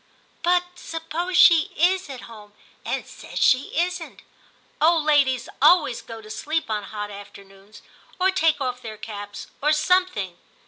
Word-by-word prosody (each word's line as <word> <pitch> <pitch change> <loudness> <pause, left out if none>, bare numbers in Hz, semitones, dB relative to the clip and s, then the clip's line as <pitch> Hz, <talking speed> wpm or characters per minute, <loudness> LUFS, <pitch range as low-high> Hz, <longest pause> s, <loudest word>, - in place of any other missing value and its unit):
' - - -37
But 355 +1 +3 0.2
suppose 330 +2 -3
she 335 -5 +7
is 365 +1 +2
at 260 -3 -7
home 210 -3 -13 0.3
and - - -3
says - - -11
she 260 +3 +2
isn't. 350 -1 -3 0.6
Old 325 0 +4
ladies 275 -4 +2
always 295 -5 +4
go 225 -1 -10
to 215 - -13
sleep 310 +1 -2
on 210 -2 -2
hot 210 0 -6
afternoons, 200 0 -13 0.4
or 375 +1 +3
take 325 -5 +2
off 250 -2 -3
their 220 -2 -8
caps, 205 -1 -8 0.2
or 300 +2 +3
some 365 +4 +3
thing. 190 - -6
285 Hz, 155 wpm, -23 LUFS, 215-340 Hz, 0.6 s, she